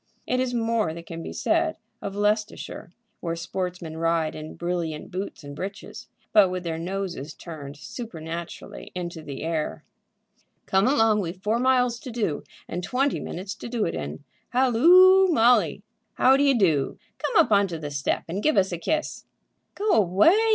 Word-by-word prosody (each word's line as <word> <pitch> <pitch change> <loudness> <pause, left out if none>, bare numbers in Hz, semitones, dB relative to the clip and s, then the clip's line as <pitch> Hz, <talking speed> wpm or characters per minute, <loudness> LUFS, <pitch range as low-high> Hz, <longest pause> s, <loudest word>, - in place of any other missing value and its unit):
It 255 - 0
is 255 -1 0
more 225 -8 0
than 170 - -8
can 165 0 -7
be - - -6
said 330 -1 +1 0.2
of 200 0 -5
Leicestershire, 210 -3 -1 0.3
where 165 -1 -3
sportsmen 175 -1 -4
ride 165 -1 +1
in 155 0 -8
brilliant 170 -3 -3
boots 185 -3 -5
and 145 0 -8
breeches, 195 +5 -7 0.3
but 205 -4 +7
with 180 0 -4
their 165 -2 -3
noses 175 -5 -4
turned 145 -4 -9
supernaturally 170 - -7
into 175 -2 -5
the 145 -2 -7
air. 160 -1 -2 0.8
"Come 190 +3 +3
along; 225 -6 +4
we've 180 0 -5
four 220 +3 +1
miles 250 -2 +2
to 255 - -8
do, 220 -11 -2 0.2
and 180 - -4
twenty 260 +9 0
minutes 190 +3 -5
to - - -8
do 235 -3 0
it - - -2
in. 75 +2 -5 0.3
Halloo, 345 +11 +6
Molly, 225 - +3 0.3
how 260 +1 +5
d'ye 280 0 +4
do? 165 - +2 0.2
Come 335 -10 +4
up - - -13
on 200 -1 +5
to 170 -3 -5
the 150 -2 -6
step 140 -1 -1
and 185 +5 -3
give 305 -4 +2
us 190 -1 +3
a 175 - -3
kiss." 310 - -2 0.5
"Go 415 +1 0
away!" 205 - +5
190 Hz, 170 wpm, -25 LUFS, 165-240 Hz, 0.8 s, but